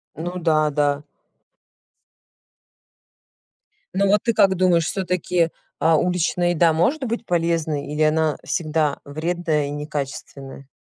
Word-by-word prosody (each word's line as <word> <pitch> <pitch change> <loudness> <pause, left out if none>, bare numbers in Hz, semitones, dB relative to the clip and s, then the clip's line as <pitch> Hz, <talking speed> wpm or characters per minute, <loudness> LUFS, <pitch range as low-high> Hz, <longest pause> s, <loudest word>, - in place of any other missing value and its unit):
Ну 175 +3 -5
да, 155 -3 +2
да. 145 0 0 2.9
Ну, 200 +1 +2
вот 205 +1 +3
ты 230 - +1
как 195 -2 +4
думаешь, 175 -3 +3
всё-таки, 180 -2 0 0.3
а, 160 0 +4
уличная 175 +1 +1
еда 170 -1 +3
может 250 - +1
быть 235 0 -3
полезной 165 -4 0
или 150 - -2
она 155 -1 +2
всегда 155 -2 0
вредная 155 0 -1
и - - -5
некачественная? 140 -2 -6
165 Hz, 115 wpm, -22 LUFS, 150-180 Hz, 2.9 s, как